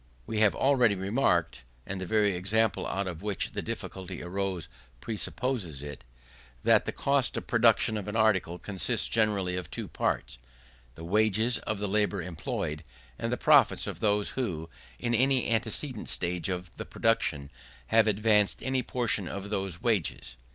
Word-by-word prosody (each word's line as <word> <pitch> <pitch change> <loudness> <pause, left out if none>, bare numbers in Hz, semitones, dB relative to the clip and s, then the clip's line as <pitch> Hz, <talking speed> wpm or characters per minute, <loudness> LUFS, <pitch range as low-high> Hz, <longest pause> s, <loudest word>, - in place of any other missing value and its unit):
We 110 -1 -2
have 110 -2 +4
already 125 -6 +3
remarked 95 - 0 0.2
(and 95 -1 -5
the 95 - -4
very 105 -2 +2
example 105 +5 +1
out 100 +1 -2
of 85 -4 -5
which 105 -1 -2
the - - -3
difficulty 95 -2 -6
arose 95 -2 -3 0.3
presupposes 105 - -2
it) 70 -4 -8 0.6
that - - +4
the - - -2
cost 140 -2 +1
of - - -4
production 115 -1 +3
of 105 - -5
an 105 - -4
article 105 -6 +2
consists 95 0 0
generally 100 -5 +1
of 90 - -5
two - - -5
parts, - - -2 0.6
the 80 - -10
wages 110 +5 +2
of 110 - -3
the 105 +1 -2
labour 105 -2 0
employed, 85 -2 -4 0.4
and - - -2
the - - 0
profits - - +5
of - - -5
those 105 -1 +1
who, 85 -11 -3 0.3
in 120 - -2
any 130 +2 +3
antecedent 115 +2 -1
stage 90 +2 -1
of 90 -1 -4
the - - -5
production, 75 -11 0 0.4
have 110 -1 +5
advanced 105 -1 +2
any 130 0 0
portion 115 -7 -1
of 100 +2 -6
those 95 -2 -3
wages. 70 - -1
100 Hz, 160 wpm, -29 LUFS, 90-110 Hz, 0.6 s, profits